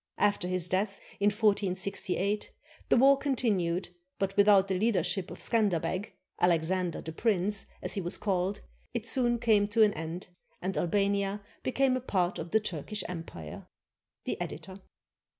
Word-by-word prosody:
After 205 -3 +2
his 180 -1 0
death, 195 +2 -1 0.2
in 200 - +3
1468, 200 -1 0 0.4
the - - +5
war 270 +3 +6
continued, 195 -11 0 0.3
but 195 0 -1
without 200 -1 +6
the 195 - 0
leadership 195 -3 +1
of - - -8
Scanderbeg 190 -4 0 0.3
[Alexander 175 0 +1
the 160 - -6
Prince], 200 +1 +1 0.2
as - - -2
he 195 - -1
was 175 +1 -2
called, 195 0 -1 0.3
it 235 -2 -2
soon 240 0 +2
came 215 -3 +3
to 220 +2 +4
an 210 -1 +4
end, 165 +3 -6 0.3
and 190 +1 -3
Albania 200 +2 0 0.2
became 260 0 +2
a 255 - -2
part 185 -7 0
of 165 - -5
the 220 - +3
Turkish 205 +1 -4
Empire. 165 - -8 0.6
The - - -3
Editor. 185 +5 -6
200 Hz, 150 wpm, -30 LUFS, 180-210 Hz, 0.6 s, war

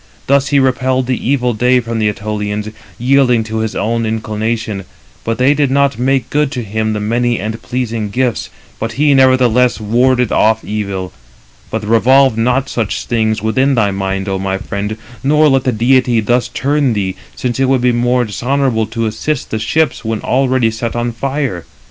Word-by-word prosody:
Thus 140 0 +2
he 145 - +2
repelled 130 -1 +1
the 125 -1 -2
evil 125 -3 +1
day 125 +3 +3
from 115 -1 -3
the 105 -1 +2
Ætolians, 105 +1 -4 0.2
yielding 125 -2 +3
to 110 0 -4
his 110 -1 -2
own 115 +3 -1
inclination; 110 -2 -3 0.4
but 115 0 -2
they 130 +4 +4
did 145 -2 +1
not 140 -3 +1
make 130 -1 0
good 150 -1 +1
to 125 -3 -3
him 110 +1 -2
the 105 - -2
many 120 +3 0
and 110 +3 -4
pleasing 115 -4 -3
gifts; 125 +2 -1 0.3
but 115 0 -3
he 145 +3 +3
nevertheless 125 -2 +3
warded 125 +2 +2
off 110 +1 +2
evil. 100 -3 -4 0.6
But 110 -1 -3
revolve 130 +3 +4
not 125 +4 +1
such 115 -4 -3
things 110 -2 0
within 130 +5 +2
thy 105 -4 +2
mind, 95 0 -3
O 95 -1 -1
my 95 0 -2
friend, 105 +2 -4 0.3
nor 150 +2 +4
let 135 -2 +2
the 130 - +2
deity 120 +1 +2
328 110 - -3
thus 120 +2 +1
turn 140 -2 0
thee, 95 -3 -2 0.2
since 125 0 -3
it 135 - +3
would 135 -2 +2
be 125 0 +3
more 120 +1 +1
dishonourable 120 +1 0
to 115 +1 -3
assist 125 +6 -3
the 110 - -1
ships 150 +6 0
[when 110 -1 -2
already] 130 -3 +1
set 115 +1 -4
on 120 0 -1
fire. 135 - -3
120 Hz, 185 wpm, -15 LUFS, 110-130 Hz, 0.6 s, they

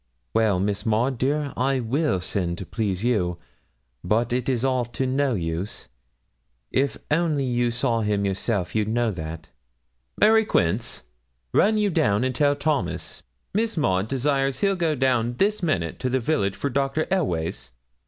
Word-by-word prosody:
'Well, 110 -4 +3
Miss 100 +1 -1
Maud, 115 +3 +1
dear, 145 +1 0
I 135 +1 +1
will 125 - 0
send 90 -2 -2
to 95 - -6
please 100 -1 -2
you, 95 -8 +1 0.7
but 115 +3 +1
it 125 +1 0
is 125 -1 0
all 130 -2 +2
to 120 +3 -3
no 130 0 +1
use. 85 +2 -4 0.8
If 140 +1 +1
only 155 -3 +2
you 120 -1 +1
saw 115 -1 0
him 105 -1 0
yourself 95 -1 -1
you'd 110 -1 +1
know 115 0 +1
that. 80 -3 -7 0.7
Mary 220 +1 +6
Quince, 110 - 0 0.5
run 215 +2 +4
you 210 -2 +2
down 105 -7 +2
and 130 0 0
tell 145 +2 +2
Thomas, 145 0 -2 0.3
Miss 220 0 0
Maud 95 -9 +1
desires 135 +1 0
he'll 195 -1 +3
go 165 -4 0
down 125 -3 +1
this 205 +4 +1
minute 90 - -1
to 130 - -1
the 130 +1 +1
village 115 -7 0
for 140 - -2
Dr. 140 +4 0
Elweys.' 85 - -1
120 Hz, 160 wpm, -24 LUFS, 100-140 Hz, 0.8 s, Mary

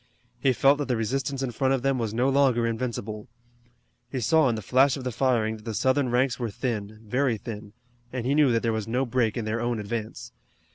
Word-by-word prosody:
He 135 - +3
felt 135 +3 +4
that 145 - -2
the 125 -3 0
resistance 135 +4 -2
in 130 - -2
front 135 +3 +1
of 130 - -4
them 135 -1 +1
was 115 -3 -2
no 120 +4 +1
longer 135 -4 +3
invincible. 115 -2 -3 0.8
He 130 - -2
saw 150 +4 +3
in 115 - 0
the 110 - -6
flash 130 +6 +3
of 135 - -7
the 125 - -2
firing 115 -3 +1
that 105 - -16
the 110 -2 -4
Southern 130 +2 +2
ranks 125 +2 +1
were 120 -2 -2
thin, 110 -2 -4
very 125 +2 0
thin, 105 -2 -8 0.4
and 125 -2 -4
he 135 - +2
knew 145 -3 +4
that 115 -1 +1
there 115 -1 +1
was 110 -1 -3
no 125 +4 0
break 120 -3 0
in 115 - -2
their 110 +2 -2
own 120 0 -1
advance. 110 +1 -5
120 Hz, 230 wpm, -26 LUFS, 110-130 Hz, 0.8 s, felt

